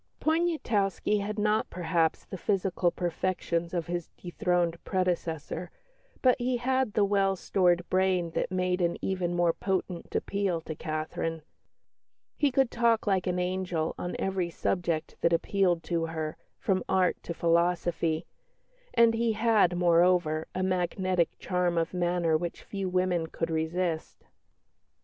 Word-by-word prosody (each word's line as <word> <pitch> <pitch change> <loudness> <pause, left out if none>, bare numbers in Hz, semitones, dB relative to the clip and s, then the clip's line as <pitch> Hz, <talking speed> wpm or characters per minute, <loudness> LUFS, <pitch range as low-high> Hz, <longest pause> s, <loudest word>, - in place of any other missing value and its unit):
Poniatowski 245 - +1
had 210 +2 -3
not 210 +1 +1
perhaps 165 -2 0
the - - -7
physical 190 -2 +1
perfections 170 -1 -2
of 170 -3 -2
his 175 -1 -4
dethroned 175 -1 -1
predecessor, 175 -2 -2 0.5
but 255 -1 +6
he 245 0 0
had 260 -2 0
the 205 - +3
well 195 -1 +2
stored 175 -2 +1
brain 185 -2 +1
that - - -1
made 180 0 0
an 170 -1 +1
even 180 -2 -1
more 175 -1 +3
potent 185 -2 -3
appeal 195 -4 0
to 160 - -6
Catherine. 155 +1 -3 0.9
He 290 - +2
could 265 -1 +2
talk 235 -2 +2
"like 190 -3 +1
an 180 0 0
angel" 180 -3 -1
on 175 - -3
every 190 -2 -1
subject 170 -2 -2
that 170 - +3
appealed 175 0 +1
to 165 -2 -1
her, 160 -1 -4 0.2
from 185 -2 0
art 185 -2 +2
to 170 - -6
philosophy; 170 -1 +1 0.7
and 230 -1 +6
he 225 0 +1
had, 215 -5 +3
moreover, 170 -2 +3
a 185 - 0
magnetic 185 -1 0
charm 180 -2 0
of 165 +1 0
manner 175 -2 +1
which 170 +2 -3
few 195 -2 -4
women 180 -2 +1
could 165 0 -3
resist. 160 +1 -2
180 Hz, 140 wpm, -29 LUFS, 170-195 Hz, 0.9 s, but